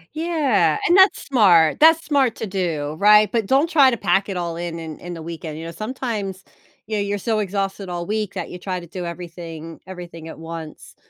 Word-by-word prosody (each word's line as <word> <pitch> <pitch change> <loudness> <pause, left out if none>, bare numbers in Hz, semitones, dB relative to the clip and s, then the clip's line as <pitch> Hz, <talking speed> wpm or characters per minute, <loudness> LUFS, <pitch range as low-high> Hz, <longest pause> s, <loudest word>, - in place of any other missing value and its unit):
Yeah, 280 - +2
and 350 - +4
that's 385 +1 +5
smart, 185 - +4
that's 325 +1 +6
smart 270 -6 +2
to 225 - -4
do, 165 -6 -2
right? 210 0 +6
But 225 -4 0
don't 275 +7 +3
try 285 -6 +6
to 235 - -1
pack 195 +1 +1
it 190 - -3
all 170 -1 -3
in 170 -1 -5
in 160 -2 -8
in 175 0 -7
the 160 - -8
weekend, 160 -2 -7
you 165 - -7
know, 165 - -6
sometimes, 215 -3 -4 0.4
you 215 0 -3
know, 205 - 0
you're 200 0 -1
so, 220 +2 -1
exhausted 195 -1 -3
all 175 -1 -4
week 210 -2 -3
that 180 - -4
you 180 - -8
try 185 -1 -3
to 175 - -10
do 175 +1 -6
everything 170 -2 -8
everything 175 -3 -9
at - - -9
once, 165 -1 -9
190 Hz, 215 wpm, -21 LUFS, 170-220 Hz, 0.4 s, that's